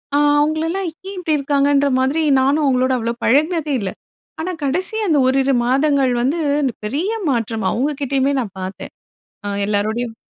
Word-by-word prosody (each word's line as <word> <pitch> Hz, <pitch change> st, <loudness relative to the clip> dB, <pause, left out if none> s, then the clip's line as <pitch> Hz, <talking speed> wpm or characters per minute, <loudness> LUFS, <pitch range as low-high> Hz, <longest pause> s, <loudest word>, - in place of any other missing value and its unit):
அ -, -, +4 dB, 0.2 s
அவங்களலாம் 320 Hz, +5 st, 0 dB, 0.2 s
ஏன் 395 Hz, -, -8 dB
இப்படி 320 Hz, -4 st, 0 dB
இருக்காங்கன்ற 280 Hz, 0 st, +2 dB
மாதிரி 270 Hz, +5 st, +1 dB, 0.2 s
நானும் 280 Hz, +4 st, +2 dB
அவங்களோட 255 Hz, -1 st, +2 dB
அவ்வளோ 230 Hz, 0 st, -2 dB
பழகினதே 305 Hz, +3 st, +2 dB
இல்ல. 190 Hz, -, -3 dB, 0.5 s
ஆனா 365 Hz, +3 st, -3 dB
கடைசி 350 Hz, +9 st, -1 dB
அந்த 315 Hz, -4 st, +3 dB
ஓரிரு 270 Hz, +1 st, +2 dB
மாதங்கள் 275 Hz, +1 st, +2 dB
வந்து 280 Hz, +7 st, 0 dB, 0.2 s
அந்த 260 Hz, -3 st, 0 dB
பெரிய 295 Hz, -, -2 dB, 0.2 s
மாற்றம் 225 Hz, -4 st, -1 dB
அவங்க 275 Hz, +6 st, 0 dB
கிட்டேயுமே 275 Hz, 0 st, +1 dB
நான் 205 Hz, -5 st, -7 dB
பார்த்தேன். 185 Hz, +1 st, -7 dB, 0.5 s
அ -, -, -2 dB, 0.2 s
எல்லாரோடையும் 220 Hz, +3 st, -1 dB
275 Hz, 150 wpm, -19 LUFS, 245-305 Hz, 0.5 s, அ